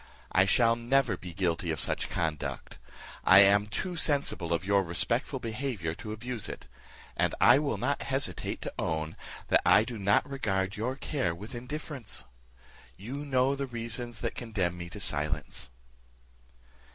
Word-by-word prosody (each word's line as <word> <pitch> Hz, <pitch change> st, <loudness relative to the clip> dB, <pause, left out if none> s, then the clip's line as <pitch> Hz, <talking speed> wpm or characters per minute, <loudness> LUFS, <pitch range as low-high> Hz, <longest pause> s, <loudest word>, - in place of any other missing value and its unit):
I 95 Hz, +1 st, +5 dB
shall 115 Hz, +3 st, +4 dB
never 120 Hz, -2 st, +2 dB
be 90 Hz, 0 st, -9 dB
guilty 85 Hz, -1 st, -1 dB
of 80 Hz, -, -1 dB
such -, -, 0 dB
conduct; 75 Hz, -4 st, -3 dB, 0.4 s
I 95 Hz, -, +7 dB
am 100 Hz, +1 st, +5 dB
too 180 Hz, -, -3 dB
sensible 140 Hz, -, 0 dB
of 85 Hz, +2 st, 0 dB
your 100 Hz, 0 st, +4 dB
respectful 115 Hz, -, 0 dB
behaviour 115 Hz, -, -3 dB
to 105 Hz, +5 st, -7 dB
abuse 115 Hz, 0 st, -4 dB
it; -, -, -7 dB, 0.5 s
and -, -, +1 dB
I -, -, +7 dB
will -, -, -1 dB
not -, -, -1 dB
hesitate -, -, -1 dB
to -, -, -5 dB
own, 80 Hz, -1 st, -2 dB, 0.3 s
that -, -, +5 dB
I -, -, +6 dB
do 115 Hz, -1 st, -6 dB
not 100 Hz, +7 st, +3 dB
regard 95 Hz, -8 st, -1 dB
your 120 Hz, +5 st, -2 dB
care 130 Hz, -, -2 dB
with 105 Hz, +8 st, -9 dB
indifference. 130 Hz, -, -5 dB, 0.7 s
You 120 Hz, +8 st, -6 dB
know 135 Hz, -2 st, +1 dB
the 140 Hz, 0 st, -3 dB
reasons 120 Hz, 0 st, -3 dB
that 115 Hz, -, -2 dB
condemn 100 Hz, -7 st, -2 dB
me 85 Hz, -1 st, -7 dB
to 105 Hz, +4 st, -8 dB
silence." 75 Hz, -6 st, -2 dB
110 Hz, 155 wpm, -29 LUFS, 90-125 Hz, 0.7 s, I